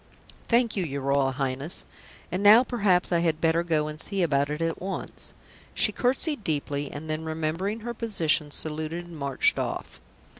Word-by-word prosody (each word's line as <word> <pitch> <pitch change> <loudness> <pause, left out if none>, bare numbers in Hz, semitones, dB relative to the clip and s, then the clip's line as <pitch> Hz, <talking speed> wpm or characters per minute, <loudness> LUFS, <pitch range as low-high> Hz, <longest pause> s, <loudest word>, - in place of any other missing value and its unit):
"Thank 235 -1 +2
you, 195 - 0
your 140 -4 -4
Royal 135 0 +2
Highness. 135 +4 -1 0.5
And 185 +3 -1
now 215 +4 +8
perhaps 200 -9 +1
I 170 - +3
had 165 -2 +1
better 165 0 +2
go 160 -3 0
and 155 0 -6
see 195 -3 0
about 140 -3 +1
it 150 +1 -3
at 165 0 -2
once." 190 +1 -3 0.4
She - - +3
curtsied 260 +1 0
deeply, 145 -3 -2
and 150 +2 -7
then, 155 +1 -3
remembering 160 +7 -2
her 240 +2 -4
position, 170 -10 0
saluted 155 +3 -2
and 170 -1 -11
marched 150 - +2
off. - - -4
165 Hz, 175 wpm, -26 LUFS, 150-195 Hz, 0.5 s, now